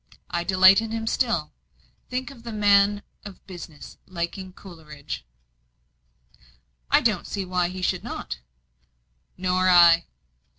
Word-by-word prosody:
I 170 0 -1
delight 190 +2 +6
in 225 - -5
him 225 0 -4
still. 225 - -1 0.6
Think 255 +2 -4
of 240 -4 -15
a - - -4
man 205 -1 +3 0.2
of 200 -3 -12
business 170 -5 -11
liking 185 +1 -5
Coleridge." 155 - -10 1.6
"I - - +5
don't - - 0
see 195 -2 -4
why 180 -1 0
he 185 0 -7
should - - 0
not." 65 - -6 1.0
"Nor 185 0 +1
I. 170 -1 +6
185 Hz, 125 wpm, -24 LUFS, 170-205 Hz, 1.6 s, delight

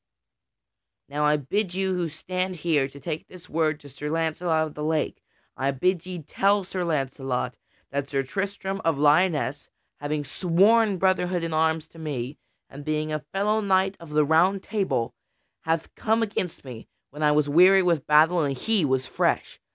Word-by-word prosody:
Now 150 +1 0
I 150 0 +4
bid 180 +7 -2
you 190 0 0
who 175 -2 -1
stand 185 +3 -3
here 155 -4 +1
to 140 +1 -13
take 155 +2 -5
this 180 -2 -14
word 155 -1 0
to 145 - -12
Sir 150 +3 -6
Launcelot 160 0 0
of 155 - -8
the 150 - -6
Lake; 155 0 -1 0.3
I 135 +2 0
bid 180 +6 0
ye 180 -3 -6
tell 200 +6 +2
Sir 185 0 -4
Launcelot 135 -5 -2 0.4
that 140 0 -2
Sir 135 -1 0
Tristram 195 +5 -3
of 165 -3 +1
Lyonesse, 150 -1 +2 0.3
having 150 0 -2
sworn 195 +7 +3
brother 185 0 +2
hood 175 -1 -2
in 165 -1 -3
arms 160 0 +1
to 165 - -15
me, 145 -3 -4 0.3
and 145 +1 -10
being 155 0 -2
a 155 - -1
fellow 200 +8 -1
knight 190 -1 +2
of 170 -2 -12
the 150 0 +2
Round 180 +6 +3
Table, 195 - -1 0.5
hath 160 0 -1
come 225 +1 +1
against 180 -7 -4
me 120 -4 -9 0.2
when 150 +2 -9
I 150 -1 +4
was 150 0 +2
weary 185 +6 +6
with 170 -6 +1
battle 160 +3 +5
and 140 -3 -1
he 215 - +1
was 130 -2 +1
fresh. - - -1
160 Hz, 180 wpm, -25 LUFS, 145-185 Hz, 0.5 s, weary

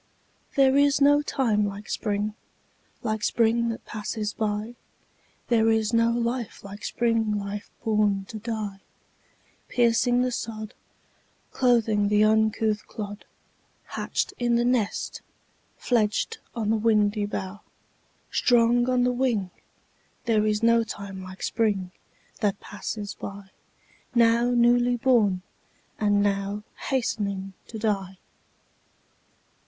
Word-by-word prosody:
There 270 -1 +5
is 285 0 +4
no 290 +1 +5
time 230 -7 +1
like 200 0 -4
Spring, 210 -1 -2 0.7
Like 215 -2 -2
Spring 235 0 +2
that 230 - -5
passes 215 -1 -4
by; 215 +1 -2 0.8
There 225 -2 +4
is 220 0 +1
no 230 0 +4
life 235 0 -2
like 200 +1 -10
Spring 225 -3 +1
life 200 0 -5
born 210 -3 +1
to 220 - -6
die, 215 -3 -4 0.9
Piercing 245 +1 +3
the 255 - 0
sod, 220 -2 -5 0.8
Clothing 225 -5 +2
the 210 +1 +4
uncouth 220 0 +2
clod, 205 -1 -7 0.7
Hatched - - -2
in 240 -1 +2
the 240 0 +2
nest, 240 -4 0 0.6
Fledged 220 -4 0 0.2
on 220 -2 0
the 225 - +2
windy 210 -1 +2
bough, 195 0 -5 0.7
Strong 240 0 +3
on 250 -1 +3
the 250 - +3
wing: 235 -7 0 0.7
There 215 -2 +2
is 210 +1 0
no 230 0 +5
time 200 -3 -7
like 185 0 -9
Spring 200 -5 0 0.5
that 200 -1 0
passes 205 0 -6
by, 200 -1 -9 0.6
Now 235 +1 +4
newly 245 0 +3
born, 215 -7 +2 0.6
and 205 -1 +3
now 200 +1 -1 0.3
Hastening 200 -7 -1
to 225 - -7
die. 195 -4 -2
220 Hz, 115 wpm, -26 LUFS, 205-235 Hz, 0.9 s, There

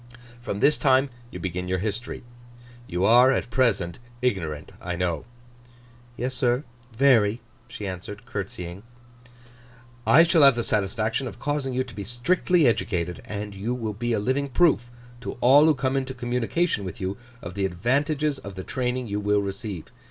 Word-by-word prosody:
From 100 -4 -4
this 150 - +4
time 135 -1 +3 0.2
you - - -8
begin 90 0 -3
your 95 0 0
history. 110 +5 -4 0.6
You 90 +2 0
are, 125 +4 +7
at 125 - -1
present, 100 -10 +1 0.2
ignorant, 80 -11 -1
I 90 0 -3
know.' 85 -3 -1 0.9
'Yes, 125 +2 -2
sir, 125 0 +1 0.3
very,' 115 -3 +4 0.3
she 105 -3 -7
answered, 100 +4 -7
curtseying. 95 -4 -6 1.3
'I 165 - +8
shall 170 -1 +4
have 140 -3 +7
the 120 - -1
satisfaction 110 +5 0
of - - -8
causing 145 -3 -2
you 130 - +1
to 125 -2 -12
be 100 - -5
strictly 150 - +2
educated; 90 -7 0
and 105 0 -5
you 105 +6 -2
will 110 -4 -3
be 120 +3 -2
a 110 - +1
living 130 +6 0
proof 135 -5 +3 0.3
to 125 - -5
all 135 +5 +6
who 160 -1 +5
come 135 0 -1
into 130 -1 -2
communication 125 - 0
with 90 -3 -6
you, 95 +1 -2 0.2
of 90 -6 -8
the 100 0 -1
advantages 140 - 0
of 100 -1 -9
the 95 - -6
training 125 +1 -2
you 105 -2 -2
will 105 0 +2
receive. 100 -3 -5
120 Hz, 165 wpm, -25 LUFS, 100-130 Hz, 1.3 s, I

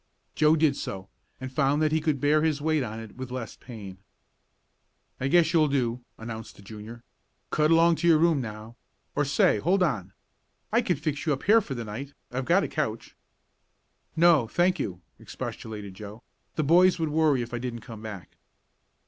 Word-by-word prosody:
Joe 155 +1 +4
did 155 -3 +3
so, 95 -5 -6 0.3
and 130 0 -6
found 140 +1 +2
that 155 - +2
he 160 0 +1
could 150 -3 0
bear 150 +3 +3
his 155 -2 +1
weight 155 0 +1
on 110 -3 -4
it 110 -2 -10
with 130 -1 -6
less 125 -2 -6
pain. 100 -6 -10 1.2
"I 130 - -1
guess 165 +2 +4
you'll 155 -2 +4
do," 125 -4 -1 0.2
announced 110 -1 -8
the 100 - -16
Junior. 110 +3 -10 0.5
"Cut 150 0 +2
along 165 0 +5
to 170 - 0
your 165 -2 +6
room 160 -3 +3
now 110 0 -8 0.4
or 145 - +2
say 135 -5 +3
hold 185 - +2
on, 110 - -1 0.6
I - - +4
can - - 0
fix 150 +1 -3
you 150 - +3
up 135 - -5
here 225 +3 +5
for 140 -9 -6
the 115 -1 -5
night. 135 +7 -7 0.2
I've 130 +1 -3
got 185 +6 +3
a - - -1
couch 130 -8 -4 0.5
" - - -45
"No, 155 -9 +5
thank 180 +8 +1
you," 90 -1 -4 0.2
expostulated 105 -3 -7
Joe. 105 +4 -10 0.3
"The 155 - 0
boys 180 +5 +5
would 160 -2 -1
worry 150 -4 +2
if 120 - -10
I 120 - -2
didn't 120 -1 -5
come 110 -1 -10
back." 105 -5 -9
135 Hz, 190 wpm, -27 LUFS, 110-155 Hz, 1.2 s, your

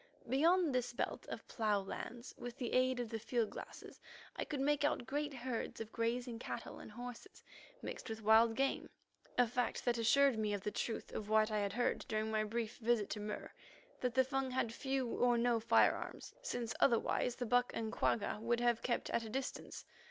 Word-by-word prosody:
Beyond 320 +5 +4
this 250 -1 0
belt - - -3
of - - -6
plough 210 -3 +1
lands, 235 +5 -6
with 245 -1 -7
the 245 - -3
aid 255 0 +3
of 240 -2 -2
the 225 - -2
field 230 0 0
glasses, - - -9 0.3
I - - -2
could 290 - -3
make 290 +1 +2
out 290 -4 +1
great 290 +4 -1
herds 255 -3 -4
of 225 -1 -6
grazing 235 0 -1
cattle - - -6
and - - -10
horses, 245 - -9 0.4
mixed - - -6
with 220 0 -5
wild 225 +1 +6
game, 270 +2 0 0.5
a 245 - +6
fact 245 +1 -1
that 240 -1 +2
assured 270 +1 +4
me 210 -1 0
of 200 - -5
the 210 - -2
truth 225 +2 -3
of 210 -1 -5
what 215 0 +4
I 215 - +1
had 200 -1 -1
heard 245 +1 +1
during 220 -2 -1
my 215 0 +2
brief 225 +1 -3
visit 230 -3 +1
to 210 - -2
Mur, 210 0 -5 0.5
that 250 -1 -1
the 260 - +6
Fung 270 0 -1
had 250 -3 0
few 265 0 -1
or 240 +1 +2
no 235 0 +3
firearms, 225 - +2
since 245 - -3
otherwise 240 0 +3
the 245 - -3
buck 245 +1 +3
and 220 -1 -2
quagga 210 0 0
would 235 +1 +1
have 240 -1 +2
kept 240 - -1
at 230 - +1
a 220 - -6
distance. 265 +4 -4
235 Hz, 200 wpm, -37 LUFS, 220-255 Hz, 0.5 s, wild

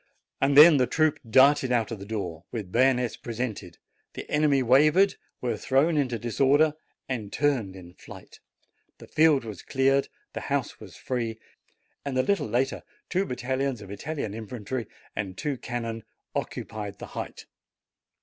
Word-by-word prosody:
Then 145 +3 +8
the 125 -2 +2
troop 155 +3 +1
darted 130 +2 +5
out 120 -2 +1
of 110 - -5
the 100 - -9
door, 90 -7 -4
with 105 -6 -5
bay 130 +5 +5
onets 125 -2 -1
presented; 110 -7 -5 0.4
the - - -7
enemy 145 -3 +3
wavered, 150 +10 +5 0.3
were 120 -3 -1
thrown 140 +9 +2
into 130 -5 0
disorder, 140 +6 +3 0.3
and 110 -6 -4
turned 130 -10 0
in 90 -2 -12
flight; - - -13 0.6
the - - -12
field 155 -5 +3
was 105 -4 -7
cleared, 135 +1 +2 0.3
the - - -4
house - - -1
was - - -12
free, 115 -3 -3 0.7
and 140 -2 -3
a 130 - +3
little 200 - 0
later 125 +5 0 0.3
two 185 +2 +1
battalions 130 0 -2
of 100 -2 -10
Italian 140 0 -4
infantry 115 +1 -5 0.3
and 95 -3 -4
two 145 -2 -2
cannon 115 -3 -5 0.3
occupied 105 -2 -5
the - - -8
height. - - -6
125 Hz, 150 wpm, -26 LUFS, 110-140 Hz, 0.7 s, Then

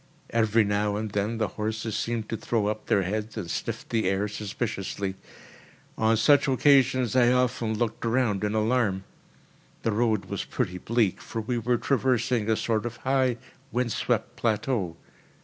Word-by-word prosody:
Every 115 -1 +3
now 105 0 0
and 110 0 -3
then 105 +3 -1
the 110 -3 0
horses 110 +2 -3
seemed 115 -2 -2
to - - -1
throw 110 -1 -1
up 105 +1 -3
their 100 - +3
heads 110 +4 -3
and 85 -6 -4
sniffed - - -4
the 110 -5 +1
air 95 +2 0
suspiciously. 100 -2 -3 0.8
On 110 0 +2
such 145 +6 +5
occasions 130 -3 +3
I 125 -1 +5
often 120 -3 +1
looked 115 -1 -2
round 115 -4 +1
in 105 +1 0
alarm. 110 -3 +1 0.8
The 115 - +1
road 110 -1 +1
was - - -3
pretty 90 0 -3
bleak, 115 -2 +1
for 115 - -5
we 120 +2 -1
were 120 +2 +1
traversing 125 -4 +1
a 110 - +4
sort 110 +1 0
of 120 0 -7
high, 130 0 +1 0.3
wind 125 -1 0
swept - - -1
plateau. 110 -6 -1
110 Hz, 165 wpm, -27 LUFS, 105-120 Hz, 0.8 s, such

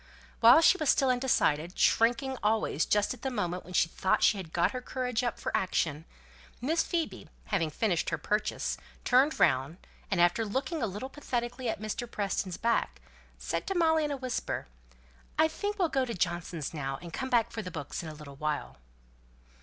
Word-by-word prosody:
While 240 +7 +8
she 380 +3 +5
was 310 -3 +1
still 265 -2 +4
undecided, 185 - +1
shrinking 260 +4 +3
always 215 +1 +1
just 210 +2 +2
at 255 - -13
the 265 - -1
moment 180 -7 -2
when 180 - -11
she 165 - +4
thought 190 +3 0
she 210 - +5
had 180 -5 -7
got 170 +1 +2
her 255 - -4
courage 250 -2 -2
up 240 -3 -2
for - - -2
action, 160 -4 0 0.5
Miss 320 +6 +1
Phoebe, 335 -3 -3 0.2
having 170 -7 0
finished 175 +1 0
her - - -1
purchase, 210 +1 -1 0.3
turned 265 +5 +4
round, 135 +6 +2 0.3
and 190 - 0
after 175 +6 +4
looking 265 - -2
a 230 - +1
little 205 +6 -5
pathetically 245 -3 -3
at - - -2
Mr. 215 +3 -4
Preston's 195 -4 -2
back, 235 0 0 0.4
said - - -3
to 390 - -1
Molly 320 -2 +3
in 300 - -1
a 285 - -2
whisper 255 -2 -3 0.7
"I 315 - +5
think 410 +6 -4
we'll 365 -4 +2
go 265 -3 +1
to 235 - -4
Johnson's 175 -4 -2
now, 135 -3 -3
and 170 -1 -10
come 265 -1 -3
back 235 -3 +2
for 225 - -4
the 185 - -6
books 150 -6 -5
in 165 - -7
a 155 - -8
little 145 -2 -11
while." 150 0 -3
225 Hz, 195 wpm, -30 LUFS, 175-265 Hz, 0.7 s, While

